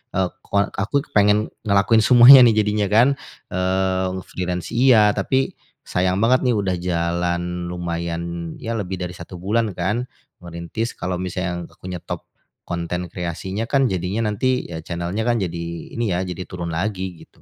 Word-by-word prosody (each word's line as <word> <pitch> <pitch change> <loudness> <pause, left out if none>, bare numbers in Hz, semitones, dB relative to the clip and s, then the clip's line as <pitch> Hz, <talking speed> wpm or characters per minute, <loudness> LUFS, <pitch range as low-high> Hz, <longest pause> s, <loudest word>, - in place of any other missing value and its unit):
eee 95 -2 +1 0.2
koa 100 0 +1
aku 115 +9 0
kepengen 105 +1 +3 0.2
ngelakuin 105 +2 +4
semuanya 125 +2 +10
nih 115 -2 +4
jadinya 105 -1 0
kan, 115 +4 +6 0.5
eee 95 0 0
freelance 90 -1 -4
iya, 115 -4 +5
tapi 130 +7 0 0.3
sayang 90 +1 +1
banget 125 +2 +4
nih 120 - +3
udah 95 -3 0
jalan 85 0 -1
lumayan, 85 -1 -4
ya 115 0 -3
lebih 95 -3 -3
dari 90 -1 -4
1 85 +2 -10
bulan 105 +1 0
kan 105 +8 -1 0.4
ngerintis. 85 +7 -4
Kalau 90 0 -2
misalnya 90 -1 -3
aku - - -18
nyetop 90 - -6 0.4
konten 85 0 -3
kreasinya 90 +5 -4
kan, 135 -3 +3
jadinya 95 +4 -1
nanti 125 +5 0
ya 80 -1 -5
channel 85 0 -4
nya 110 - 0
kan 120 -1 +2
jadi 85 -2 -3 0.3
ini 115 -4 -1
ya, 90 - 0
jadi 90 0 -5
turun 85 -2 -5
lagi, 95 -1 -3
gitu. - - -28
95 Hz, 160 wpm, -21 LUFS, 85-110 Hz, 0.5 s, semuanya